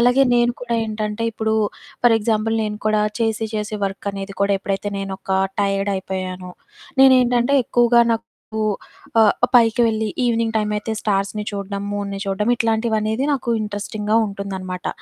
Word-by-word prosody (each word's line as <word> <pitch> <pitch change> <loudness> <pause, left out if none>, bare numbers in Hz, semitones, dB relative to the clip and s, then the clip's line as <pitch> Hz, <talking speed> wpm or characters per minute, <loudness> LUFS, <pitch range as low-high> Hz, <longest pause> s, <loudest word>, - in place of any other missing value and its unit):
అలాగే 250 +3 +5
నేను 240 0 +3
కూడా 240 -1 -2
ఏంటంటే 215 0 -3
ఇప్పుడు 220 0 -1 0.5
ఫర్ 235 -2 +6
ఎగ్జాంపుల్ 225 +1 0
నేను 210 0 -4
కూడా 215 0 +3 0.2
చేసి 225 -1 0
చేసి 215 +1 -3
వర్క్ 195 +1 -4
అనేది 195 0 -6
కూడా 200 0 +3
ఎప్పుడైతే 200 +1 -2
నేనొక 195 0 -6 0.3
టైర్డ్ 195 0 0
అయిపోయానో 185 -1 -5 0.5
నేనేంటంటే 250 -1 +5
ఎక్కువగా 240 0 +4
నాకు 225 0 -2 1.0
ఆహ్, 215 -2 +5 0.2
పైకి 230 -1 +5
వెళ్లి 220 -1 0 0.2
ఈవినింగ్ 230 -1 +1
టైమ్ 210 -1 0
అయితే 210 +2 -4
స్టార్స్‌ని 205 0 -1
చూడడం, 200 -1 -4
మూన్‌ని 200 -1 -3
చూడడం 200 +3 -1
ఇట్లాంటివనేది 220 0 0
నాకు 260 -4 -3
ఇంట్రెస్టింగ్‌గా 210 +1 -3
ఉంటుందనమాట. 190 -2 -5
215 Hz, 140 wpm, -21 LUFS, 200-230 Hz, 1.0 s, ఫర్